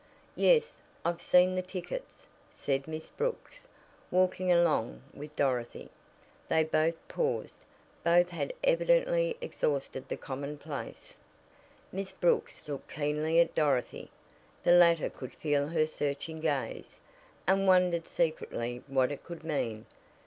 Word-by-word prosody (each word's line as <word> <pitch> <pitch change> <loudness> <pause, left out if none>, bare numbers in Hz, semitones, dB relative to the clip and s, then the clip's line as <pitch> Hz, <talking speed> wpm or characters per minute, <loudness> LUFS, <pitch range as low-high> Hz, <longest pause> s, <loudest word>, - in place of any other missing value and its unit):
"Yes, 485 0 +3 0.3
I've 170 0 -1
seen 180 +1 +5
the 185 - 0
tickets," 185 - -7 0.3
said 135 0 -1
Miss 160 0 -6
Brooks, - - -4 0.4
walking 185 0 +2
along 170 - +2
with 150 +1 -10
Dorothy. 125 -5 -1 0.6
Then 160 0 +3
both 160 +1 +2
paused. 480 0 -2 0.4
Both 175 +1 +4
had 175 - -3
evidently - - +3
exhausted 140 - -2
the - - -3
commonplace. 140 +2 -6 0.8
Miss 195 0 -4
Brooks 480 - 0
looked 145 -2 -6
keenly 150 +2 +1
at 170 - +3
Dorothy. 140 -5 0 0.5
The - - +4
latter 170 -2 +5
could 130 - -9
feel 145 -2 0
her 155 -1 +2
searching 150 +1 -3
gaze, 145 -4 -2 0.5
and 195 +2 +3
wondered 180 -3 +4
secretly 125 -7 -2
what 135 -1 +2
it 145 - -6
could 170 -2 -9
mean. 115 -9 -2
165 Hz, 120 wpm, -30 LUFS, 145-185 Hz, 0.8 s, seen